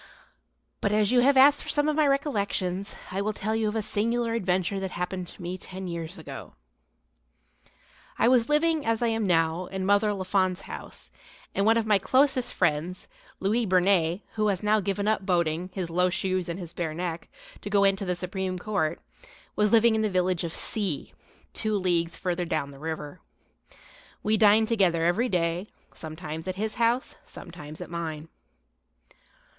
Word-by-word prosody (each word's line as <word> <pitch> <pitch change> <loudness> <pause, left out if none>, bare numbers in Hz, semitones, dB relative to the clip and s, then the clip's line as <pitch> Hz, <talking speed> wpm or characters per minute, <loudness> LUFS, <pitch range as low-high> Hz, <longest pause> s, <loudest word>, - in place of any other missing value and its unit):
But 200 - +1
as 210 0 +3
you 250 - +5
have 270 +2 +4
asked 280 +2 +7
for - - -7
some 295 0 +1
of 305 - +1
my 305 -1 +3
recollections, 200 - -1 0.2
I 190 +2 -1
will 215 +1 -1
tell 215 +2 -2
you 220 -1 +1
of 210 - -2
a 220 - 0
singular 230 +3 0
adventure 190 -2 0
that 190 0 -3
happened 180 0 -4
to - - -12
me 180 +2 -4
ten 190 0 -7
years 170 +1 -5
ago. 160 - -9 1.6
I - - +3
was 245 -1 +4
living, 310 +1 +2
as 230 +1 0
I 235 - +2
am 225 -2 0
now, 165 0 +1
in 190 -1 -4
Mother 205 +2 +3
Lafon's 185 -1 0
house, - - -10 0.4
and 195 +2 +1
one 225 +1 +5
of 230 - 0
my 210 -2 +4
closest 260 +3 +2
friends, 165 +5 -1 0.3
Louis 215 +4 +1
Bernet 180 -1 +2
who 215 -1 +1
has 195 -2 -1
now 215 +1 +3
given 200 +1 -2
up 215 -2 +1
boating, 175 -2 0
his 180 -3 -4
low 180 +2 +2
shoes 185 -1 -1
and 170 - -3
his 175 -3 -6
bare 160 -3 -3
neck, 170 -1 -4 0.3
to - - -6
go 200 -1 +3
into 195 0 +2
the 180 -2 -1
Supreme 185 +1 -3
Court, 180 -5 -1 0.6
was 210 -1 +2
living 230 0 +5
in 220 - +1
the 215 - +1
village 185 -2 +1
of 170 - -3
C., 195 -4 -2 0.4
two 215 -1 -1
leagues 170 -3 0
further 180 -1 -2
down 155 -4 -2
the 135 - -13
river. 160 +1 -6 1.0
We 215 +1 +2
dined 215 +1 +5
together 180 -7 +2
every 225 +9 +2
day, 175 +1 0 0.3
sometimes 160 0 -7
at 185 - -2
his 215 +2 -2
house, 235 +3 +1
sometimes 155 -4 -10
at - - -7
mine. 160 -2 -5
190 Hz, 180 wpm, -27 LUFS, 175-215 Hz, 1.6 s, asked